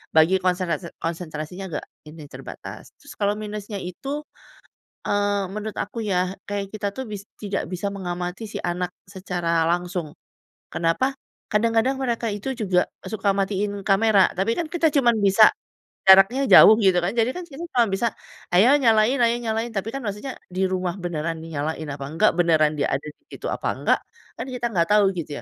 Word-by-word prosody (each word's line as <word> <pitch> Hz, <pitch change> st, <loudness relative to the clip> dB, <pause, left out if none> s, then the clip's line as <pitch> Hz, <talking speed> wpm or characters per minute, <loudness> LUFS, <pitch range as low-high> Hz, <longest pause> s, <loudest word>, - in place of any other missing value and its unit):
bagi 160 Hz, +4 st, +5 dB
konsentrasi, 180 Hz, -1 st, -1 dB
konsentrasinya 165 Hz, +2 st, -5 dB
agak 150 Hz, -, -4 dB, 0.2 s
ini 155 Hz, -1 st, -11 dB
terbatas. -, -, -9 dB
Terus 285 Hz, -, -13 dB
kalau 205 Hz, 0 st, +2 dB
minusnya 210 Hz, -1 st, -6 dB
itu, 275 Hz, -, -5 dB, 0.8 s
eee, 205 Hz, -1 st, +1 dB
menurut 215 Hz, +1 st, -5 dB
aku 225 Hz, +2 st, -4 dB
ya, 185 Hz, -2 st, 0 dB, 0.2 s
kayak 200 Hz, -1 st, -2 dB
kita 205 Hz, -1 st, -2 dB
tuh 265 Hz, -, -4 dB
bis 205 Hz, -1 st, -5 dB, 0.2 s
tidak 200 Hz, -4 st, -2 dB
bisa 185 Hz, +3 st, -2 dB
mengamati 180 Hz, +1 st, -4 dB
si -, -, -5 dB
anak 175 Hz, +1 st, -2 dB, 0.2 s
secara 175 Hz, -3 st, -1 dB
langsung. 175 Hz, -3 st, -2 dB, 0.6 s
Kenapa? 175 Hz, +12 st, +1 dB, 0.4 s
Kadang-kadang 230 Hz, +4 st, +2 dB
mereka 235 Hz, -2 st, -1 dB
itu 205 Hz, +6 st, -4 dB
juga, 190 Hz, -6 st, +2 dB, 0.2 s
eee, -, -, -8 dB
suka 200 Hz, -2 st, +1 dB
matiin 200 Hz, +1 st, -1 dB
kamera, 200 Hz, 0 st, +4 dB
tapi 195 Hz, +5 st, +1 dB
kan 330 Hz, -, -1 dB
kita 335 Hz, -1 st, +1 dB
cuman 245 Hz, -5 st, +3 dB
bisa, 200 Hz, +2 st, +7 dB, 0.6 s
jaraknya 195 Hz, +8 st, +7 dB
jauh 220 Hz, -3 st, +9 dB
gitu 190 Hz, -3 st, +4 dB
kan. 175 Hz, -, 0 dB
Jadi 230 Hz, +1 st, +2 dB
kan 360 Hz, -, -4 dB
kita 300 Hz, +4 st, -8 dB
cuman 240 Hz, -3 st, +4 dB
bisa, 235 Hz, +5 st, +1 dB, 0.5 s
"Ayo 230 Hz, +10 st, +6 dB
nyalain, 225 Hz, +1 st, +4 dB
ayo 235 Hz, 0 st, +4 dB
nyalain." 225 Hz, +1 st, -2 dB
Tapi 200 Hz, +2 st, -2 dB
kan 275 Hz, -, -2 dB
maksudnya 210 Hz, +6 st, -5 dB
di 185 Hz, +1 st, -3 dB
rumah 185 Hz, -2 st, -2 dB
beneran 165 Hz, -3 st, -3 dB
dinyalain 160 Hz, 0 st, -4 dB
apa 140 Hz, 0 st, -6 dB
enggak, 200 Hz, +8 st, +3 dB
benaran 160 Hz, -3 st, +4 dB
dia 145 Hz, -, +1 dB
ada 140 Hz, -, -1 dB
di 150 Hz, -, -11 dB
situ -, -, -7 dB
apa -, -, -3 dB
enggak, -, -, +2 dB, 0.4 s
kan -, -, -4 dB
kita 250 Hz, -1 st, -3 dB
enggak 170 Hz, -4 st, +2 dB
tahu 205 Hz, -2 st, +5 dB
gitu 150 Hz, -4 st, -5 dB
195 Hz, 170 wpm, -23 LUFS, 175-225 Hz, 0.8 s, jauh